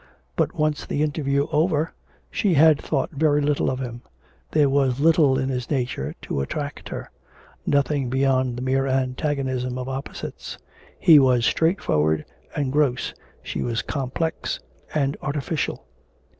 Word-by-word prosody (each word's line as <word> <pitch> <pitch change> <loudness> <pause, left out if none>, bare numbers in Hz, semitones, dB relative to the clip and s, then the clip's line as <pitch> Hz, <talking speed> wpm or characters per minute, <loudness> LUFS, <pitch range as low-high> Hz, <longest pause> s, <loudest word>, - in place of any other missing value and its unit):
But - - 0
once 155 -2 0
the 145 - 0
interview 140 -2 0
over, 155 0 +1 0.4
she 190 -5 +1
had 155 0 +6
thought - - -1
very 150 -1 +2
little 145 0 +1
of 130 - -1
him; 120 -2 -5 0.5
there 150 -2 +4
was 135 -2 +2
little 150 -3 +4
in 130 0 -1
his 125 -2 -3
nature 125 - -2
to 70 - -2
attract 145 - -4
hers; - - -5 0.6
nothing 140 -2 +1
beyond 130 -1 +1
the 125 - -4
mere 135 +1 +1
antagonism 130 -1 -1
of 125 0 -4
opposites 135 +1 -6 0.4
he 160 -3 +8
was 125 -3 +4
straightforward 80 - +2 0.3
and 140 -3 0
gross, 140 -4 +1 0.3
she - - -4
was 120 0 -1
complex 145 +4 -2 0.4
and 140 -1 +1
artificial. 145 - -2
135 Hz, 140 wpm, -24 LUFS, 130-150 Hz, 0.6 s, he